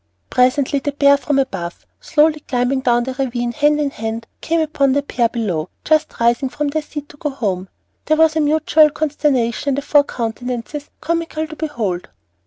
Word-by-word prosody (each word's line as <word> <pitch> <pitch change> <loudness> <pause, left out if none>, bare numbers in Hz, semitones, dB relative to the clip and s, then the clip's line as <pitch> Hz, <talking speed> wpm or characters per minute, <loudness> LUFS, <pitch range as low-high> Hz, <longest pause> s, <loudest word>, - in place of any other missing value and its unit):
Presently 260 +3 +2
the 285 +1 -3
pair 280 0 +5
from 285 0 -1
above, 190 -11 -3
slowly 305 0 +2
climbing 255 -1 0
down 240 -2 +2
the 260 +1 -4
ravine 245 -2 -2
hand 295 +3 +2
in 290 -2 0
hand, 225 -1 -4 0.2
came 330 +1 0
upon 290 -4 +1
the 285 +1 +1
pair 240 -4 0
below, 185 -9 -2
just 310 0 +1
rising 235 +3 +2
from 295 +2 -2
their 310 +2 -1
seat 295 -1 -7
to 290 - -15
go 295 - -2
home. 195 -8 -3 0.4
There 310 - +2
was 320 0 +4
a - - +2
mutual 310 0 +4
consternation 290 -4 0
in 275 - +1
the 280 - -3
four 290 0 +4
countenances 245 +3 -4
comical 330 -1 -2
to 310 - -9
behold. 225 - -3
280 Hz, 185 wpm, -19 LUFS, 240-300 Hz, 0.4 s, pair